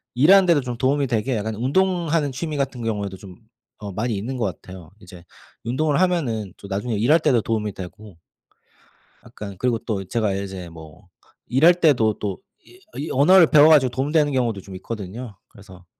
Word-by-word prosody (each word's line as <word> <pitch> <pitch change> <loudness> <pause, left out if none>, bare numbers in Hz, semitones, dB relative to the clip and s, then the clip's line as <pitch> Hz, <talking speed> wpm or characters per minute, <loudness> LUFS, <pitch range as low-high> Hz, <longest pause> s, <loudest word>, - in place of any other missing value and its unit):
일하는데도 170 +3 +5
좀 125 -2 -6
도움이 135 +3 +1
되게 120 +1 -1
약간 110 +1 -4
운동하는 165 - 0
취미 150 +3 -4
같은 135 -3 -3
경우에도 100 -4 -3
좀 95 -1 -13 0.4
어 105 -1 -7
많이 110 +4 -2
있는 120 +7 -4
것 115 - -1
같아요. 90 -2 -8
이제 90 -3 -14 0.4
운동을 145 +6 0
하면은 130 - -1
또 - - -12
나중에 110 +4 -3
일할 120 +11 +3
때도 135 -7 +2
도움이 105 -2 -2
되고 95 +1 -11 1.1
약간 100 -2 -9
그리고 125 -2 0
또 105 -4 -4
제가 110 +2 -1
이제 95 -3 -6
뭐 80 +3 -14 0.4
일할 155 +8 +5
때도 140 -11 +2
또 100 -3 -4 0.3
이 365 - -19 0.2
이 150 - -4
언어를 165 +6 +6
배워 150 0 +6
가지고 145 -5 +5
도움 135 +3 -2
되는 150 -2 +2
경우도 120 -6 -1
좀 95 0 -11
있거든요. 105 +3 -7
그래서 95 -3 -16
115 Hz, 365 characters per minute, -22 LUFS, 100-145 Hz, 1.1 s, 언어를